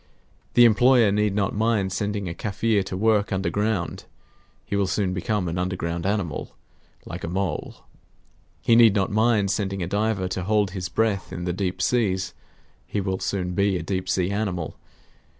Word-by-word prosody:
The 120 - +8
employer 120 -1 +5
need 105 -1 +1
not 100 -2 0
mind 105 -3 +1
sending 100 -1 -2
a 85 - -3
Kaffir 105 +1 0
to 95 - -4
work 110 0 +2
underground; 100 0 -1 0.6
he - - -3
will 100 -1 +1
soon 95 0 0
become 95 +1 -1
an 85 +2 -2
underground 90 -1 -2
animal, 100 -7 -2 0.5
like 85 +1 -7
a - - -3
mole. 90 -2 -3 0.8
He 115 - +4
need 115 -3 +7
not 100 -1 +1
mind 110 -2 +2
sending 95 -1 -2
a - - -3
diver 100 -1 0
to 90 0 -3
hold 105 -2 +2
his 90 -2 -4
breath 105 +1 0
in 85 - -5
the 90 - -1
deep 90 0 -2
seas; 95 -6 +1 0.5
he 105 - -2
will 95 -1 -2
soon 90 -2 -2
be 100 0 +2
a - - -5
deep 95 -2 -3
sea 95 0 +1
animal. 95 -6 -2
100 Hz, 170 wpm, -24 LUFS, 90-105 Hz, 0.8 s, The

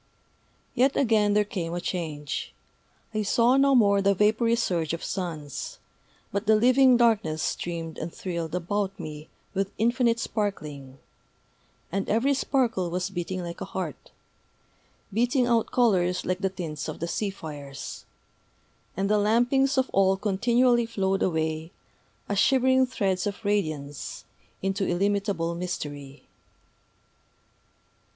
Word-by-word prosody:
Yet 265 +2 +3
again 215 -5 +3
there 210 - +4
came 175 -6 -4
a - - -1
change. 155 -5 -4 0.6
I 215 - 0
saw 235 +5 +3
no 275 0 +4
more 200 -4 +5
that 200 0 +3
vapory 220 +3 +3
surge 170 -9 -1
of 165 - -4
suns; 160 -7 -4 0.5
but 200 +2 -2
the 220 - +6
living 255 +3 +5
darkness 205 -10 +2
streamed 165 -2 -3
and 165 - -4
thrilled 170 -3 -4
about 195 +2 -2
me 155 -2 -7 0.2
with 195 0 -1
infinite 235 +1 +2
sparkling; 150 - -4 0.9
and 195 +2 -2
every 240 +6 +3
sparkle 250 -9 0
was 180 +2 -2
beating 185 0 -3
like 170 0 -7
a - - -2
heart, - - -4 1.0
beating 245 +4 +2
out 235 -2 +2
colors 185 -7 +2
like 185 0 -1
the 195 -1 0
tints 165 -5 -5
of - - -6
the 170 - -2
sea 205 +4 -1
fires. 145 -7 -8 0.9
And 195 +1 +1
the 210 +1 +3
lampings 245 +6 +2
of 260 0 +3
all 190 0 +4
continually 235 +4 +2
flowed 195 -4 0
away, 160 -2 -1 0.6
as 200 -1 0
shivering 260 +1 +4
threads 195 -6 -1
of 205 +2 -6
radiance, 155 -9 -2 0.4
into 195 0 0
illimitable 195 -2 0
Mystery.... 145 -5 -6
195 Hz, 130 wpm, -26 LUFS, 170-230 Hz, 1.0 s, the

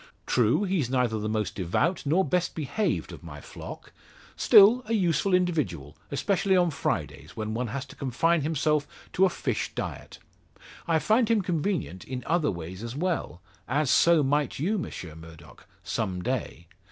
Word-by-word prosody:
True, - - +2
he's 180 - 0
neither 125 -4 +1
the 105 +1 -3
most 110 -1 -1
devout 140 - -1
nor 180 +6 +3
best 180 -1 0
behaved 160 +8 -1
of - - -10
my - - -9
flock; - - -10 0.4
still 220 +2 +7
a 225 - -1
useful 180 -3 +1
individual, 150 - 0
especially 190 +5 +1
on 175 -2 +3
Fridays, 145 - -3
when 110 0 -3
one 120 +2 -2
has 130 +3 -4
to - - -14
confine 155 +6 +1
himself 150 0 0 0.3
to 190 - +4
a - - +3
fish - - -2
diet. - - -6 0.7
I 165 -1 +3
find 220 +7 +2
him 220 -3 +3
convenient 170 - -2
in 125 -1 -6
other 165 -2 +1
ways 90 +2 -6
as 115 +1 -6
well; 160 - -2 0.3
as 140 +1 +1
so 170 -3 +5
might 145 0 0
you, 195 +9 0
Monsieur 90 - -6
Murdock 80 0 -14 0.2
some 90 -1 -2
day. 125 -9 -3
150 Hz, 165 wpm, -27 LUFS, 115-180 Hz, 0.7 s, still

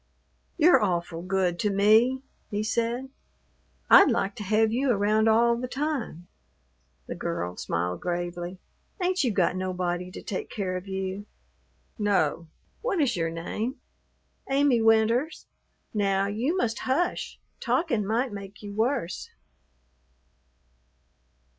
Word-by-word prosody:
"You're 315 -6 +6
awful 170 -3 -1
good 185 -1 0
to 210 - +1
me," 220 +6 +4 0.3
he 205 +1 -2
said. 235 +4 -1 0.8
"I'd - - +8
like 195 +1 0
to 210 - -5
have 215 +2 +2
you 265 +3 +1
around 215 0 +3
all 235 +2 +4
the 250 +1 -4
time." 265 - -3 0.8
The - - -5
girl 170 - -3
smiled 90 +1 -2
gravely. 175 +1 -3 0.4
"Ain't 365 -2 +1
you 245 - +1
got 185 -3 +1
nobody 180 -1 -2
to - - -9
take 190 - -4
care 190 -3 -3
of 185 +2 -6
you?" 190 +1 -4 0.7
"No. 170 -6 +1 0.3
What 470 -7 -1
is 265 -7 +2
your 165 -2 0
name?" 210 - -4 0.7
"Amy 270 -3 +3
Winters. 225 +7 +2 0.5
Now 195 -2 +1
you 235 - -1
must 230 -9 -1
hush. 280 +7 -1 0.2
Talkin' 300 - 0
might 225 +4 -1
make 200 +1 -9
you 205 -1 -7
worse." 220 -4 -1
210 Hz, 125 wpm, -27 LUFS, 185-245 Hz, 0.8 s, I'd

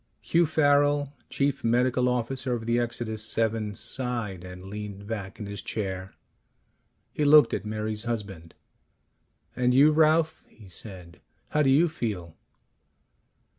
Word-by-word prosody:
Hugh 170 0 +2
Farrel, 145 -2 +2 0.2
Chief 140 +1 -1
Medical 125 +2 +2
Officer 125 +1 -1
of 115 -2 -3
the 120 +1 +1
Exodus 110 -2 -2
VII, 110 -2 0
sighed 115 -9 -3
and 90 0 -9
leaned 100 0 -7
back 100 -3 -6
in 105 - -5
his 100 -1 -5
chair. 95 -3 -4 1.0
He 150 - -1
looked 145 -4 +7
at 105 - -3
Mary's 110 0 -3
husband. 100 -8 -5 1.0
"And 125 0 +2
you, 145 +3 +7
Ralph," 160 +1 +3
he 105 -3 -17
said. 90 -3 -8 0.3
"How 150 - +1
do 140 - +3
you 150 +6 +5
feel?" 105 - -4
115 Hz, 135 wpm, -27 LUFS, 100-140 Hz, 1.0 s, looked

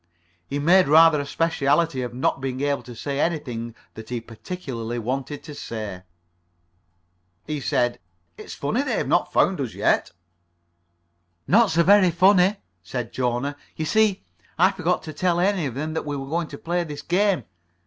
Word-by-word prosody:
He 140 - -3
made 175 +5 +4
rather 160 +1 +6
a 140 - -6
specialty 150 -2 +1
of 125 -1 -4
not 130 +2 -1
being 130 -1 -3
able 145 0 0
to 120 - -11
say 140 +4 -4
anything 125 -9 -2 0.2
that 110 0 -10
he 120 -1 -2
particularly 120 - -6
wanted 135 +5 -4
to 150 - -9
say. 110 -8 -6 1.4
[Pg 150 -1 -3
46]He - - -9
said: 120 0 0 0.4
"It's - - -9
funny - - -1
they've - - -1
not - - +1
found - - +2
us - - -4
yet." - - +1 1.3
"Not 225 +2 +4
so 170 +1 +3
very 195 0 +6
funny," 185 +3 +4 0.3
said 120 +6 -5
Jona. 125 +3 -1 0.2
"You 155 - -3
see, 215 +2 +2 0.3
I 185 +4 +5
forgot 180 -2 -1
to 155 - -7
tell 175 +3 +1
any 185 -4 +1
of 125 - -6
them 155 +3 -3
that 160 - -3
we 145 -1 -2
were 135 - -5
going 165 +1 -1
to 140 - -9
play 175 +3 -1
this 150 -3 -7
game. 185 - +1
145 Hz, 170 wpm, -23 LUFS, 125-175 Hz, 1.4 s, rather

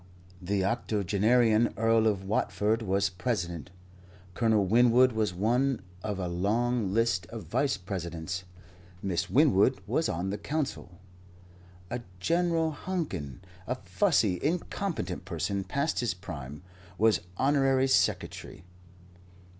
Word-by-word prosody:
The 95 +1 0
octogenarian 110 +2 +2
Earl 115 0 +3
of 100 -3 0
Watford 105 +2 0
was 100 -2 +1
President; 90 -4 -3 0.6
Colonel 110 -3 +2
Winwood 120 +4 +5
was 110 -3 0
one 120 +8 +1 0.2
of 105 -2 -3
a 90 -2 -2
long 105 +4 0
list 100 -5 +1
of 110 +4 -7
Vice 130 -3 0
Presidents; 90 -2 -5 0.6
Miss 95 -4 -1
Winwood - - +4
was - - 0
on 90 +4 -2
the 105 - -4
Council; 140 - -4 0.9
a 120 - -3 0.2
General 165 - +1
Hankin, 145 - -4 0.3
a 125 - -1
fussy, 125 - +1
incompetent 160 - -2
person 95 +2 -2
past 140 +8 -1
his 120 -7 -1
prime, 75 -5 -8 0.3
was 110 -3 +3 0.2
Honorary 135 -1 +3
Secretary. 130 - 0
110 Hz, 115 wpm, -29 LUFS, 90-125 Hz, 0.9 s, Winwood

